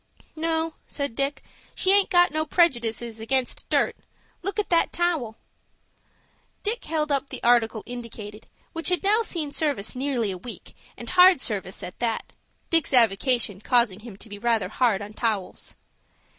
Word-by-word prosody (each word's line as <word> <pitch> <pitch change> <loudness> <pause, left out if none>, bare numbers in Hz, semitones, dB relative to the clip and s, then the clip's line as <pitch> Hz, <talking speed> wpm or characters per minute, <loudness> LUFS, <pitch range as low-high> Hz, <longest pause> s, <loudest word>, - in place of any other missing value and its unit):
"No," 325 0 -1
said 280 -4 -3
Dick. 275 +4 -2 0.3
"She 375 - +3
aint 400 0 +5
got 350 -1 +4
no 310 +1 0
prejudices 235 -9 +1
against 255 +3 -1
dirt. - - +2 0.5
Look 395 +4 -4
at 420 - -2
that 335 - +3
towel." 320 -11 -1 1.3
Dick 445 +3 -1
held 305 -2 -1
up 275 0 0
the - - -6
article 235 -2 +3
indicated, 230 -3 -9 0.3
which 330 +2 0
had 360 +1 0
now 420 +3 +3
seen 330 -9 -3
service 285 -10 -1
nearly 255 -5 -1
a 185 - -6
week, 240 +6 -8 0.2
and - - -6
hard 365 -2 +7
service 195 -6 -3
at 180 - -8
that,—Dick's 255 +6 -1
avocation 225 -2 +3
causing 235 -5 +2
him 220 -3 -11
to 225 - -11
be 205 -1 -9
rather 225 -4 0
hard 215 -3 +1
on 205 +1 -9
towels. 215 -4 -3
250 Hz, 155 wpm, -25 LUFS, 220-325 Hz, 1.3 s, hard